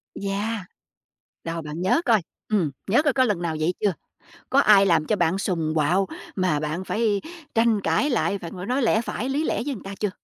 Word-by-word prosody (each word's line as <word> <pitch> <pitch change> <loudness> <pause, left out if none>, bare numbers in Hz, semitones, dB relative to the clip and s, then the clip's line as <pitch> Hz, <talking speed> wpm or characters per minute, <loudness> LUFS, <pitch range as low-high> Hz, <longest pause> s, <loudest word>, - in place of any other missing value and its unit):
Yeah, 205 +3 -2 0.9
đâu 165 0 -3
bạn 150 +2 -6
nhớ 185 - +3
coi, 225 -6 +3 0.3
ừm, 195 -9 +1 0.2
nhớ 245 +7 +5
coi 295 -3 +2
có 260 0 +3
lần 205 -7 0
nào 160 -2 -2
vậy 170 +3 +1
chưa? 205 -2 +2 0.6
Có 275 - +4
ai 205 -6 +6
làm 165 -4 +3
cho 215 - +1
bạn 175 0 +1
sùng, 165 -6 -1
quạo 175 +6 +2 0.3
mà 180 -6 +1
bạn 155 +4 -3
phải 210 -2 0 0.3
tranh 225 -2 +3
cãi 290 - +1
lại, 205 -5 +1
phải 170 - -7
ngồi 185 0 -7
nói 255 +4 0
lẽ 220 -1 +3
phải, 240 +1 -4
lý 285 +4 0
lẽ - - -1
với 290 - -2
người 220 - -9
ta 195 +1 -7
chưa? 210 - 0
200 Hz, 215 wpm, -24 LUFS, 175-225 Hz, 0.9 s, ai